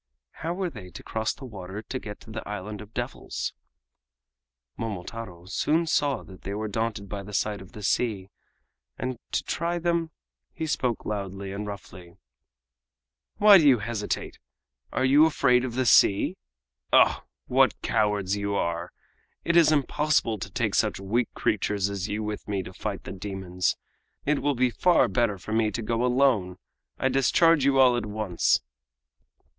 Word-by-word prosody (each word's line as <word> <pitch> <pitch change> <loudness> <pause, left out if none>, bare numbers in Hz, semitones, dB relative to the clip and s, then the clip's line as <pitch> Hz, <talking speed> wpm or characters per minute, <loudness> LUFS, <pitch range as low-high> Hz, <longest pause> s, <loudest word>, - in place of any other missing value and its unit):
How 165 +3 -2
were 185 -2 -2
they 100 -8 -10
to 85 - -11
cross 110 0 -1
the 135 - -10
water 100 -2 -7
and 130 - -3
get 105 -1 -8
to 110 - -12
the 110 0 -4
Island 105 0 -5
of 105 0 -12
Devils? 120 +2 -4 1.2
Momotaro 100 -3 -6
soon 155 - +1
saw 145 -3 +1
that 95 -1 -14
they 100 - -5
were 110 +1 -3
daunted 110 -1 -2
by 100 +1 -5
the 105 +1 -10
sight 105 -2 -1
of 95 - -14
the 105 - -9
sea, 100 -2 0 0.7
and 130 -2 -4
to - - 0
try 170 +1 -1
them 170 -1 0 0.5
he 160 - -3
spoke 125 -6 -1
loudly 100 -2 -4
and 105 +1 -5
roughly: 90 -4 -10 1.2
"Why 205 -2 +8
do 155 - +4
you 130 -3 +7
hesitate? 105 -1 -4 0.5
Are 130 - +1
you 145 +4 +6
afraid 125 -5 +3
of 125 -2 -4
the 130 0 +1
sea? 100 -3 +5 0.6
Oh! - - +5 0.2
what - - +3
cowards 105 -2 +1
you 100 0 -2
are! 85 -1 -2 0.5
It 170 - +1
is 165 -2 +6
impossible 145 -6 +1
to - - -5
take - - -1
such - - +1
weak 110 +5 0
creatures 100 -1 0
as 100 -1 -3
you 105 +1 -2
with 105 0 -5
me 100 -2 -1
to - - -10
fight - - -5
the - - -7
demons. 95 -2 -2 0.5
It 150 0 +2
will 145 -1 +1
be 125 0 +2
far 180 +8 +4
better 115 -5 +1
for 100 +4 -6
me 110 -1 +2
to 110 +3 -4
go 115 +2 0
alone. 125 -8 +2 0.4
I - - +1
discharge 135 +3 +4
you 140 -1 +3
all 130 -2 +6
at 120 - -2
once!" 105 -4 +1
110 Hz, 170 wpm, -26 LUFS, 100-130 Hz, 1.2 s, Why